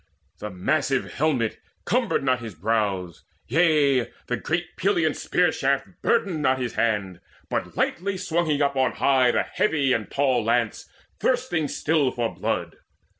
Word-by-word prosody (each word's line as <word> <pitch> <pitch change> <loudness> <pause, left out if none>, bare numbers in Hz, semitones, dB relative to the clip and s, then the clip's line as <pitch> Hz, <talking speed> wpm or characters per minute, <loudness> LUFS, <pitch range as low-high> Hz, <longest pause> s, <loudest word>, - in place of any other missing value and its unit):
The 105 - -5
massive 135 +8 -1
helmet 130 -7 0 0.3
cumbered 235 - +1
not 130 -2 +2
his 115 -5 -8
brows; 95 -3 -1 0.2
Yea, 145 -4 +3 0.2
the 125 - -1
great 175 +6 -3
Pelian 170 -6 +1
spear 180 0 +1
shaft 135 0 0
burdened 195 -9 +1
not 130 -2 +2
His 125 -3 -3
hand, 100 -6 -1 0.3
but - - -3
lightly 195 +2 -1
swung 170 -2 -1
he 150 -2 +1
up 140 0 0
on 130 -1 +2
high 130 -2 +3
The - - +2
heavy 140 -9 +1
and 115 -3 -2
tall 130 -4 +1
lance 115 0 0 0.3
thirsting 245 - 0
still 150 -1 +1
for 120 -2 -2
blood. - - -3
135 Hz, 150 wpm, -24 LUFS, 115-160 Hz, 0.3 s, Yea